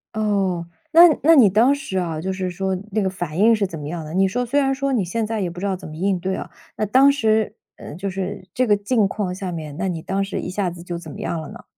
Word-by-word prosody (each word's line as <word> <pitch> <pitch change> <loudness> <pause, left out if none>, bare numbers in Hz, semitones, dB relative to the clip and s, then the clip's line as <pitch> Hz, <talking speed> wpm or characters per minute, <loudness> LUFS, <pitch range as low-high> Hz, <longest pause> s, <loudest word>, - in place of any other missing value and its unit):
哦， 195 -5 0 0.2
那 330 - +8 0.2
那 325 +3 +7
你 240 -9 +7
当 225 +8 +4
时 275 -9 -4
啊， 165 -4 -2
就 190 +4 -3
是 185 -1 -3
说 190 +1 -2 0.2
那 215 +2 0
个 190 - +1
反 175 -4 -5
应 225 +3 +6
是 210 -2 0
怎 170 -4 -6
么 145 - -6
样 165 0 -5
的？ 155 +1 -8
你 190 +1 +3
说 245 +6 -1
虽 275 +4 +1
然 270 -1 +1
说 275 0 -1
你 225 -8 +1
现 220 +6 -2
在 220 0 -3
也 185 -3 -1
不 175 +1 -9
知 195 - -3
道 195 -1 0
怎 180 - -10
么 155 - -9
应 190 +2 0
对 190 +2 -2
啊， - - -6 0.3
那 215 - -1
当 260 +7 +5
时 220 -6 +1 0.2
嗯， 150 - -9
就 195 +2 -3
是 190 +1 -5
这 255 0 +1
个 210 - +5
境 205 +1 +1
况 195 -2 -3
下 185 0 -5
面， 155 -3 -6
那 195 - -1
你 170 -3 -3
当 195 +4 -1
时 195 - -4
一 - - -5
下 190 0 -1
子 170 0 -10
就 175 -1 -5
怎 170 -2 -10
么 - - -8
样 170 - -2
了 155 - -8
呢？ - - -11
195 Hz, 310 characters per minute, -21 LUFS, 175-220 Hz, 0.3 s, 那